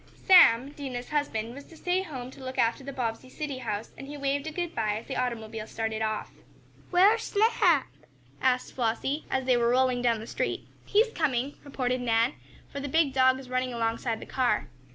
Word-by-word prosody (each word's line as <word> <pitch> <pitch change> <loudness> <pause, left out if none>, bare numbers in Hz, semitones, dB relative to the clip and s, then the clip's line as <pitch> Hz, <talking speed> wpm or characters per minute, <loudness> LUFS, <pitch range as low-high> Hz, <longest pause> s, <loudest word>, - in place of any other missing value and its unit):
Sam, 280 - +7
Dinah's 260 -4 -6
husband, 240 -7 -1
was 280 +2 -9
to 325 - -15
stay 360 +3 0
home 260 -8 -7
to 265 - -12
look 260 0 -6
after 230 +3 +1
the 275 - -6
Bobbsey 250 -1 -3
city 285 -2 -5
house, 220 -3 -4
and 270 - -9
he 290 +1 -7
waved 280 +1 -1
a - - -3
good 345 +1 -3
bye 215 -2 0
as 225 - -8
the - - -5
automobile 225 -3 -3
started 220 -1 -3
off. 215 -1 -2 0.6
"Where's 400 +5 +5
Snap?" 405 - +3 0.6
asked 255 -1 +1
Flossie, 260 +5 -1
as 265 -1 -1
they 255 -1 +4
were 235 0 +2
rolling 255 0 +2
down 235 -2 +2
the 220 - -7
street. - - -3 0.2
"He's 445 +2 +3
coming," 275 -3 0
reported 255 -3 -2
Nan, 230 +2 +2 0.3
for 280 - -7
the 285 0 -4
big 305 -1 +2
dog 260 -1 +4
was 265 -1 -10
running 255 0 0
alongside 230 0 -1
the - - -8
car. 245 -5 0
255 Hz, 195 wpm, -28 LUFS, 235-290 Hz, 0.6 s, Sam